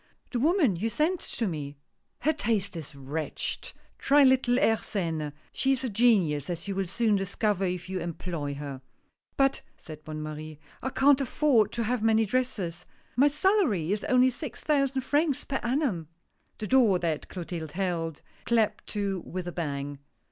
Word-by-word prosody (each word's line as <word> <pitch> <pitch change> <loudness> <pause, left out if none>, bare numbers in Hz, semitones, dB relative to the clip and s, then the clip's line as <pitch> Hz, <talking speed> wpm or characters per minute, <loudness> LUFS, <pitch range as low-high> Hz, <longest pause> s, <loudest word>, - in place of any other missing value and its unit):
" - - -40
The 245 - -1
woman 300 - +3
you 220 +6 -1
sent 325 +9 +1
to 230 - -3
me." 145 -6 -4 0.2
" - - -49
Her 310 - +3
taste 215 - 0
is 150 -3 -7
wretched 140 +2 -4
— - - -36
try 285 +1 +7
little 260 -2 +4
Airsene, 170 - 0 0.2
she 270 0 +2
is 265 0 -2
a 255 - -1
genius, 195 - +3
as 170 +2 -4
you 200 - -1
will 195 -1 -1
soon 215 +3 +2
discover 195 0 0
if 180 -1 -3
you 190 0 -3
employ 165 -4 -4
her." 140 -2 -6 0.6
"But," 275 0 +3 0.2
said 155 -2 -11
Bonne 155 0 -5
Marie, 155 0 -7 0.2
"I 265 - -2
can't 275 +1 +4
afford 250 -5 +3
to 235 - -1
have 240 +1 0
many 225 0 +4
dresses 195 -7 -2
— - - -34
my 270 +4 +5
salary 290 - +2
is 210 0 -1
only 255 0 +4
six 255 +1 -6
thousand 275 -3 +2
francs 290 +2 +1
per 270 - -1
annum! 240 - 0 0.2
" - - -45
The 215 - -4
door 230 -5 +5
that 165 -4 -2
Clotilde 170 -4 -6
held, 170 -4 -2 0.2
clapped 220 -3 +1
to 200 -3 -2
with 180 +1 -6
a - - -3
bang. 145 -4 -4
205 Hz, 180 wpm, -28 LUFS, 165-255 Hz, 0.6 s, try